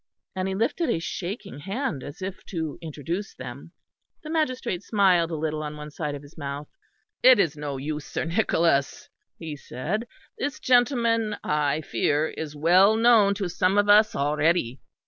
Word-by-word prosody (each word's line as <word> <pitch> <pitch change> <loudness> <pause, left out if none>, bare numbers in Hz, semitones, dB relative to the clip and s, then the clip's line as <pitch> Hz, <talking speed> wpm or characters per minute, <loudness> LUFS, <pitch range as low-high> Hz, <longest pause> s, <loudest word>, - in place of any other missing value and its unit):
And 185 0 -1
he 190 - -2
lifted 285 - 0
a - - +2
shaking 190 +2 -5
hand 195 - -3
as 145 +7 -9
if 190 0 -6
to 160 -5 -4
introduce 165 +5 -5
them. - - -9 0.5
The 310 - -6
magistrate 255 - -1
smiled 190 -6 +3
a 165 - -3
little 155 0 -2
on 150 0 -5
one 150 0 -8
side 150 -1 -4
of 145 - -9
his 145 +2 -16
mouth. 145 -1 -5 0.5
"It 255 0 +8
is 165 -7 +2
no 145 -2 -4
use, 150 +2 -4
Sir - - -3
Nicholas," 165 -6 +1 0.3
he 160 -3 -6
said, 170 - -4 0.3
"this 285 0 -3
gentleman, 235 -4 +2
I 150 0 0
fear, 145 +3 0
is 150 -2 -6
well 180 +7 +5
known 225 -3 +5
to 195 -2 -2
some 185 +3 +1
of 205 0 +3
us 210 +1 +6
already. 145 -2 +1
170 Hz, 165 wpm, -25 LUFS, 150-210 Hz, 0.5 s, It